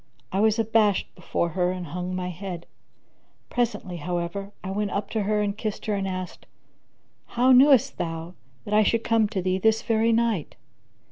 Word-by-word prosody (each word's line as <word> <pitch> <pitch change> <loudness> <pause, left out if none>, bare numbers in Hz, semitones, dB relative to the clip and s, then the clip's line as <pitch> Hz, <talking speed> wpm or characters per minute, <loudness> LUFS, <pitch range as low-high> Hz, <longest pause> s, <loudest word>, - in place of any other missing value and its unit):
I 190 - 0
was 220 +1 +3
abashed 220 -3 +2
before 170 -1 -2
her 180 +1 0
and 185 -1 -5
hung 180 +3 -4
my 180 0 -3
head; 180 -1 -6 0.9
presently, 230 -7 -1
however, 175 +4 -3
I 190 - -4
went 205 +1 -1
up 200 +1 -3
to 220 - 0
her 210 +1 +1
and 200 -1 -1
kissed 215 -1 -4
her 215 - 0
and 195 -1 -1
asked, 185 -1 -6 0.8
"How 250 +2 +3
knewest 265 -1 +5
thou 165 0 -4 0.3
that 205 - -4
I 215 - +6
should 230 +2 +2
come 225 -2 +3
to 195 -3 -3
thee 185 +1 0
this 220 +2 +2
very 225 0 +2
night?" 230 -8 0
200 Hz, 180 wpm, -25 LUFS, 180-220 Hz, 0.9 s, I